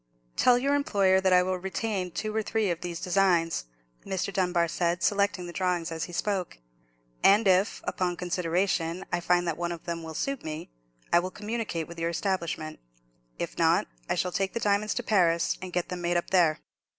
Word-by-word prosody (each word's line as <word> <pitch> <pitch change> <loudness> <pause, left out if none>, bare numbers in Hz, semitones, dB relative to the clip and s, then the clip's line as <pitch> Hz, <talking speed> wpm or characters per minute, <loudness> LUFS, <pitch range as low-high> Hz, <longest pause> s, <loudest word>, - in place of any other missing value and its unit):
"Tell 245 -1 +5
your 275 +3 +1
employer 195 -9 +3
that 190 0 +2
I 180 0 +6
will 185 0 -1
retain 190 0 -2
two 215 +5 -4
or 220 - +2
three 215 -2 0
of 170 - -4
these 175 -2 -4
designs," 175 - +2 0.4
Mr. 190 +1 -3
Dunbar 180 -3 +2
said, 170 +2 -1
selecting 200 -3 +1
the 175 - -8
drawings 180 -3 -1
as 165 0 -3
he - - -10
spoke; 190 0 -2 0.7
"and 205 +2 +6
if, 190 +3 +3
upon 180 -1 -1
consideration, 175 0 -1
I - - +2
find 175 0 +2
that 165 - -1
one 175 0 -2
of 170 -1 -6
them 170 -1 -4
will 160 -1 -8
suit 275 - -2
me, 155 - -6 0.4
I 170 - +7
will 185 +1 -3
communicate 210 -5 -4
with 170 0 -9
your 165 0 0
establishment. 170 -3 -2 0.6
If - - -5
not, - - +4 0.2
I - - +2
shall 180 - 0
take 195 +1 -1
the 230 - -1
diamonds 210 0 +1
to 245 - -2
Paris, 170 -6 +2
and 185 -1 -6
get 175 0 -2
them 180 -1 -4
made 175 0 +1
up 170 - -3
there." 170 -5 +4
180 Hz, 200 wpm, -28 LUFS, 170-200 Hz, 0.7 s, I